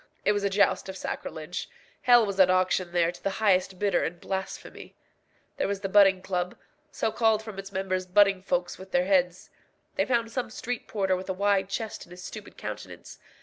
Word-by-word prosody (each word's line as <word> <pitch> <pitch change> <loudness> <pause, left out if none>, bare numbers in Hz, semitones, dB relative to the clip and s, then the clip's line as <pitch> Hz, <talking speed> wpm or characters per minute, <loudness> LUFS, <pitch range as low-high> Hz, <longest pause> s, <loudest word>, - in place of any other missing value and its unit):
It - - +5
was 205 -1 0
a 200 - +2
joust 200 -1 +2
of 190 - -6
sacrilege. 160 -2 -5 0.3
Hell 240 -2 +6
was 200 -1 -4
at 185 -1 +7
auction 185 -1 +2
there 170 -1 +2
to - - -15
the - - 0
highest 190 -3 +2
bidder 200 -2 +1
in 175 - -3
blasphemy. 190 +2 -6 0.6
There - - 0
was 200 0 -3
the 195 - -3
Butting 195 -2 +5
Club, 180 -2 -2 0.3
so 220 - -1
called 220 -1 +2
from 215 -3 -8
its 195 +1 -8
members 185 -1 -2
butting 195 0 +4
folks 180 -2 -2
with 190 0 -10
their 180 -1 +2
heads. 180 -2 +1 0.5
They - - +3
found 235 -3 0
some 245 -1 -2
street 240 +2 -5
porter 190 -3 0
with 185 +1 -6
a - - +1
wide 195 0 +1
chest 220 -1 -4
and 175 - -13
a - - -12
stupid 205 +3 -9
countenance. - - -8
195 Hz, 200 wpm, -27 LUFS, 185-205 Hz, 0.6 s, at